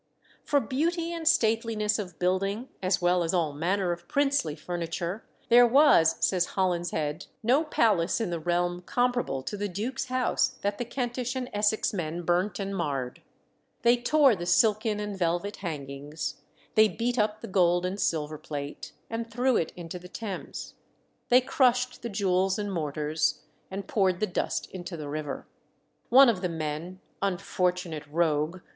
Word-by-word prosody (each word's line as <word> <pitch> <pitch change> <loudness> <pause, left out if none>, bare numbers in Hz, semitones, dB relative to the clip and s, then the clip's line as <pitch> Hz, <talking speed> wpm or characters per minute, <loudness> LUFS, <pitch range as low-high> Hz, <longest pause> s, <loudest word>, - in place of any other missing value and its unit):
For 290 - +2
beauty 330 +6 -1
and 330 -2 -4
stateliness 220 -3 +2
of 180 -5 -6
building, 195 +6 0
as 185 -1 +1
well 180 0 +3
as 170 +2 0
all 160 -4 +1
manner 180 +5 0
of 175 0 -6
princely 280 - +1
furniture, 170 +4 -4 0.3
there 240 +1 +8
was, 245 - +5
says 180 -2 0
Holinshed, 170 -5 -1 0.2
no 260 +7 +4
palace 215 - +2
in 220 -6 -2
the 170 - -2
realm 175 +2 0
comparable 245 - 0
to 205 - -4
the 205 0 -3
duke's 215 +10 -3
house 255 -1 0
that 200 0 -1
the 245 - -2
Kentish 245 +1 -3
and 255 -1 -4
Essex 210 +1 +1
men 170 -2 -3
burnt 180 +3 +1
and 195 -1 -3
marred. 140 -8 -3 0.6
They 235 +1 +6
tore 265 +1 +4
the 175 -2 -5
silken 215 +1 +3
and 210 -1 -4
velvet 175 +3 -1
hangings; 145 -3 -5 0.3
they 215 0 +6
beat 240 +3 -2
up 210 0 0
the - - -6
gold 175 -2 +3
and 190 +3 -3
silver 155 -3 -1
plate, 145 -1 -6
and 230 0 -4
threw 250 +2 +1
it 165 - 0
into 175 0 -7
the 180 +1 -12
Thames; 200 -1 -6 0.6
they 250 +1 +7
crushed 250 -2 +1
the 235 - -4
jewels 190 -2 +1
and 205 -2 -3
mortars, 150 -1 -1 0.3
and 195 0 -5
poured 190 -4 +1
the 215 - +2
dust 185 - -2
into 175 -2 -6
the 150 -2 -6
river. 150 0 -4 0.6
One 265 +3 +8
of 215 -6 +2
the 180 - -1
men 165 +3 -4 0.2
unfortunate 180 -4 -1
rogue! 160 +2 0
190 Hz, 160 wpm, -28 LUFS, 170-230 Hz, 0.6 s, there